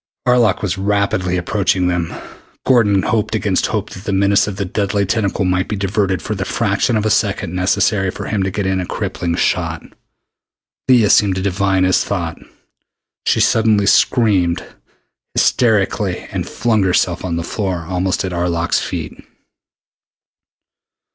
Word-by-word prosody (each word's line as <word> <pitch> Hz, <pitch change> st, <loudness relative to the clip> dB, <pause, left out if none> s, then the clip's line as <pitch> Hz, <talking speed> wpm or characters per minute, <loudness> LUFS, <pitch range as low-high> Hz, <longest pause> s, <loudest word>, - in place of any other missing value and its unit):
Arlok 120 Hz, -6 st, +3 dB
was 95 Hz, -1 st, -2 dB
rapidly 100 Hz, -2 st, 0 dB
approaching 95 Hz, 0 st, 0 dB
them. 90 Hz, -2 st, -1 dB, 0.5 s
Gordon 105 Hz, -7 st, +3 dB
hoped 110 Hz, -2 st, 0 dB
against -, -, 0 dB
hope -, -, -3 dB
that 95 Hz, -, -10 dB
the -, -, -2 dB
menace 100 Hz, +1 st, +2 dB
of 105 Hz, -, -4 dB
that 100 Hz, -2 st, -5 dB
deadly 100 Hz, -1 st, 0 dB
tentacle 100 Hz, -1 st, -1 dB
might 90 Hz, 0 st, 0 dB
be 105 Hz, -, -3 dB
diverted 95 Hz, -2 st, -1 dB
for 110 Hz, -, -3 dB
the 95 Hz, -2 st, -3 dB
fraction 105 Hz, +3 st, 0 dB
of 105 Hz, -, -1 dB
a 110 Hz, -, +1 dB
second 100 Hz, -5 st, 0 dB
necessary 95 Hz, +1 st, +1 dB
for -, -, -6 dB
him 105 Hz, -3 st, -1 dB
to 95 Hz, -, 0 dB
get 100 Hz, +1 st, -3 dB
in 95 Hz, 0 st, 0 dB
a 90 Hz, -, -5 dB
crippling 85 Hz, -1 st, -3 dB
shot. -, -, -1 dB, 1.1 s
Leah 120 Hz, -5 st, +5 dB
seemed 100 Hz, -3 st, +4 dB
to 95 Hz, -, -2 dB
divine 95 Hz, -1 st, +1 dB
his 95 Hz, 0 st, +3 dB
thought. 85 Hz, -5 st, -3 dB, 0.9 s
She -, -, +3 dB
suddenly 110 Hz, -2 st, +3 dB
screamed 100 Hz, -5 st, +2 dB, 0.7 s
hysterically 105 Hz, -4 st, +1 dB
and -, -, -4 dB
flung 110 Hz, -1 st, 0 dB
herself 90 Hz, -1 st, +1 dB
on 90 Hz, -2 st, -2 dB
the 85 Hz, -, -2 dB
floor 90 Hz, -3 st, -3 dB
almost 95 Hz, +1 st, -1 dB
at 95 Hz, -, -4 dB
Arlok's 85 Hz, -1 st, 0 dB
feet. -, -, -5 dB
95 Hz, 155 wpm, -17 LUFS, 90-105 Hz, 1.1 s, Leah